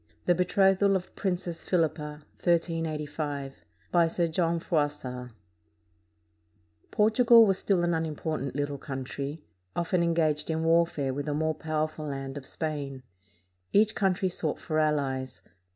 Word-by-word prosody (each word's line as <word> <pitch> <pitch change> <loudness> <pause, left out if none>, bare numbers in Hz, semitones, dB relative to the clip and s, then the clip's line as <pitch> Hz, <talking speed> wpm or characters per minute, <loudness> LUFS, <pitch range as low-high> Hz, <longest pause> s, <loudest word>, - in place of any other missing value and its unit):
THE 175 - +5
BETROTHAL 195 +2 +3
OF 185 -1 -4
PRINCESS 180 -3 -3
PHILIPPA 155 -2 -1 0.4
BY 170 -2 +4
SIR 170 +1 0
JOHN 170 0 +1
FROISSART 145 -7 -2 1.6
[Portugal 230 +2 +6
was 195 -2 +2
still 185 -4 +1
an 175 0 +2
unimportant 155 -3 -2
little 145 -1 -2
country, 140 +3 -5 0.3
often 175 +1 +1
engaged 160 -3 +1
in 160 0 0
warfare 165 -5 +2
with 145 +2 -4
the 145 - -1
more 160 +1 +1
powerful 155 0 -3
land 135 -1 -5
of 140 -2 -7
Spain. 145 -4 -4 0.7
Each 215 +1 +4
country 190 -2 +1
sought 160 -4 -2
for 155 -1 -2
allies. 140 -4 -1
160 Hz, 120 wpm, -28 LUFS, 145-175 Hz, 1.6 s, Portugal